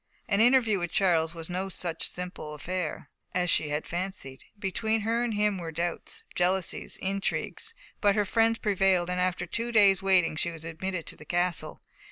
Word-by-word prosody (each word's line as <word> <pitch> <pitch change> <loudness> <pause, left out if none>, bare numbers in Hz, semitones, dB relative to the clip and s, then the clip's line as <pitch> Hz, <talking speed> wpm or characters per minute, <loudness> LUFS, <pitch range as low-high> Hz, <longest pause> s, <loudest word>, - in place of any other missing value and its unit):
An 200 - +3
interview 235 -4 +5
with 175 0 -2
Charles 165 -4 +2
was 165 -1 -7
no 185 +2 -3
such 175 -3 -3
simple 180 -4 -6
affair 165 -1 -4 0.2
as 180 -1 +2
she 150 - +2
had 150 +1 -2
fancied. 175 -7 -5
Between 220 +2 0
her 230 +3 +1
and 235 -3 -1
him 210 -2 +1
were 165 -2 -5
doubts, 170 +2 -3
jealousies, 180 0 0
intrigues. 195 - -2 0.2
But 205 -3 +3
her 210 -1 +2
friends 225 +2 +3
prevailed, 190 -4 +2
and 180 - -1
after 180 -1 0
two 230 +7 -3
days' 200 -4 +5
waiting 185 -4 +3
she 170 - 0
was 165 -1 -8
admitted 170 +1 -4
to - - -5
the - - -13
castle. 175 -1 -1
185 Hz, 180 wpm, -28 LUFS, 170-205 Hz, 0.2 s, interview